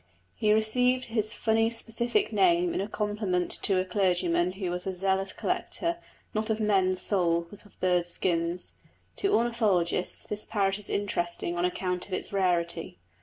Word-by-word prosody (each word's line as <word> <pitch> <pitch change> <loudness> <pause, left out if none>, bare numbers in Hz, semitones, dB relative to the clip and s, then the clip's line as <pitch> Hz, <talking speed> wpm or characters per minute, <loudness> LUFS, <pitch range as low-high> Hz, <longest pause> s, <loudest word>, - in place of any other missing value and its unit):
He 210 - +1
received 250 +4 +3
his 215 -2 +1
funny 225 0 +2
specific 235 - -1
name 350 -1 +3
in 195 - -1
compliment 205 -4 -1
to 195 - +3
a 185 - 0
clergyman 180 -2 +1
who 190 -2 -3
was 180 +1 -3
a 190 - -2
zealous 190 +1 0
collector 340 0 -2 0.3
not 215 +1 -1
of 220 0 0
men's 190 -3 +2
souls, 170 -3 +1
but 205 - -9
of - - -26
birds' 180 -1 +2
skins. 170 0 -1 0.4
To 395 - +1
ornithologists 215 -7 +1
this 210 0 -5
parrot 195 -2 0
is 205 - -2
interesting 175 -3 -2
on 175 +1 +1
account 180 0 -2
of 195 - -8
its 185 - -4
rarity. 170 - 0
195 Hz, 160 wpm, -28 LUFS, 180-220 Hz, 0.4 s, received